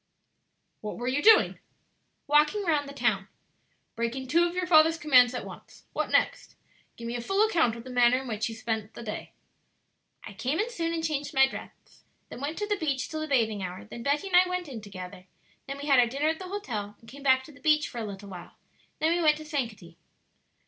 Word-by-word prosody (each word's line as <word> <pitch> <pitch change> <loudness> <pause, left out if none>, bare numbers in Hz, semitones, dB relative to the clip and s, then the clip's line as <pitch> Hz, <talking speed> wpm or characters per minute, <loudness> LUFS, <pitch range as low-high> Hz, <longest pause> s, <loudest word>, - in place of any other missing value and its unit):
What 210 - -6
were 240 - -4
you 265 +3 +1
doing?" 440 +3 +6 0.7
"Walking 300 +8 +3
round 300 -5 0
the - - -7
town." 220 -7 0 0.7
"Breaking 235 +3 -3
two 335 +6 +3
of 345 +1 -3
your 365 0 0
father's 325 -1 +5
commands 255 -6 +5
at - - -4
once. - - -12
What - - -1
next? - - 0 0.4
give 230 - -7
me 235 - -3
a 240 - -3
full 390 - +2
account 325 - +2
of 230 - -9
the 255 - -9
manner 245 0 +4
in - - -9
which 220 -1 -2
you 225 - -7
spent 220 -2 -4
the - - -8
day." 210 -2 -6 0.9
"I 205 - -9
came 255 +9 -2
in 450 +3 -1
soon 330 -6 -2
and 330 -1 -2
changed 295 -4 -2
my 270 0 +7
dress; - - -11 0.3
then - - -9
went 295 +3 -3
to 415 - -2
the 415 -1 0
beach 280 -5 -1
till 315 -1 -4
the 310 - -3
bathing 225 -7 +1
hour; 185 0 -6
then 235 +2 -9
Betty 285 +8 0
and 380 -2 -1
I 365 0 +6
went 360 -2 -3
in 245 -6 -7
together; 185 -2 -10 0.4
then 275 +1 -5
we 285 - -7
had 275 -3 +5
our 240 - +5
dinner 280 +6 0
at 320 - -2
the 370 -1 -7
hotel 220 - -5
and 230 - -19
came 280 +4 -11
back 260 -1 +4
to 305 - -13
the 280 - -18
beach 305 -1 +3
for 240 - -7
a - - -3
little 200 -1 -8
while; 180 -2 -10 0.4
then 320 +2 +2
we 350 - 0
went 305 -2 +4
to 310 - -9
Sankaty." 220 - -4
270 Hz, 230 wpm, -28 LUFS, 230-315 Hz, 0.9 s, my